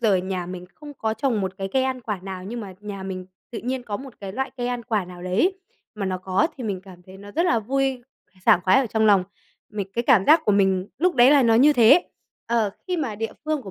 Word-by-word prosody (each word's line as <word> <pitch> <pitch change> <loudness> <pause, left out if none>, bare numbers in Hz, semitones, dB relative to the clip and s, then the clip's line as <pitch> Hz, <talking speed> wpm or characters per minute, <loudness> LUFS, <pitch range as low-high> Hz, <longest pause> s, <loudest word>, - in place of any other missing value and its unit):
giờ 215 -4 +3
nhà 185 -1 -3
mình 180 0 -7
không 295 -1 -11
có 220 -3 -2
trồng 245 -5 0
một 190 -1 -2
cái 195 0 -3
cây 265 - +2
ăn 260 -1 -2
quả 210 -5 -4
nào 185 -1 -7
nhưng 235 +4 -5
mà 195 -3 -8
nhà 205 -2 -7
mình 185 -1 -6 0.2
tự 230 - -5
nhiên 255 +1 -3
có 210 -4 -4
một 265 +2 -11
cái 195 -1 -6
loại 265 +5 -3
cây 245 -1 -2
ăn 245 -1 -3
quả 215 -4 -1
nào 180 0 -11
đấy 225 - +1 0.4
mà 205 -2 -3
nó 185 -1 -2
có 190 +4 +1
thì 250 - -5
mình 200 -4 -3
cảm 185 -2 -15
thấy 185 +1 -14
nó 200 +1 -12
rất 335 - +1
là 235 - +3
vui, 265 +3 -1 0.4
sảng 180 - +6
khoái 185 +4 +5
ở 265 - -1
trong 220 0 +1
lòng. 200 -3 +5 0.5
Mình 200 -2 -4
cái 235 +3 -2
cảm 220 -8 +5
giác 315 +2 +7
của 210 - +3
mình 190 -1 +2
lúc 360 +4 +2
đấy 245 +1 +6
là 285 -2 +6
nó 230 -2 +4
như 275 +6 +6
thế. 265 +7 +5 0.4
Ờ, 230 -3 +1 0.2
khi 365 -1 -1
mà 270 -10 -2
địa 225 +2 -4
phương 310 -2 -1
của 195 - -9
220 Hz, 265 wpm, -23 LUFS, 190-260 Hz, 0.5 s, giác